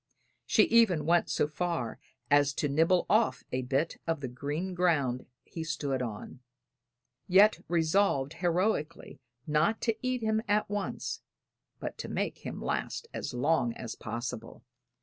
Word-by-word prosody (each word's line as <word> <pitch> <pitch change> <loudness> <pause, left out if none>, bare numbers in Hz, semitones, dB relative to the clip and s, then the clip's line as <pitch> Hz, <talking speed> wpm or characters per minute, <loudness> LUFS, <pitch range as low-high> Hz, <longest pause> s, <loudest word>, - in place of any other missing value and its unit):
She - - +5
even 225 - +4
went 170 +2 +3
so - - +1
far 155 -7 -3 0.3
as 145 -1 +5
to 145 - -1
nibble 165 +5 +3
off 220 +2 +2
a 130 - -1
bit 135 +5 -1
of 165 -2 0
the 135 - -4
green 145 +9 -4
ground 150 -9 +1 0.2
he 165 - -6
stood 145 -5 -2
on 115 +1 -6 0.9
yet 200 +4 +6
resolved 160 -4 +2
heroically 175 -4 -1 0.3
not 155 +9 +2
to 225 -2 +1
eat 255 -2 -1
him 220 0 +1
at 210 +1 +2
once, 205 -1 -3 0.6
but - - -6
to - - -5
make - - -2
him - - -6
last 460 - -3
as - - -4
long 125 -2 +2
as 115 - -6
possible. 120 0 -6
160 Hz, 145 wpm, -30 LUFS, 140-190 Hz, 0.9 s, yet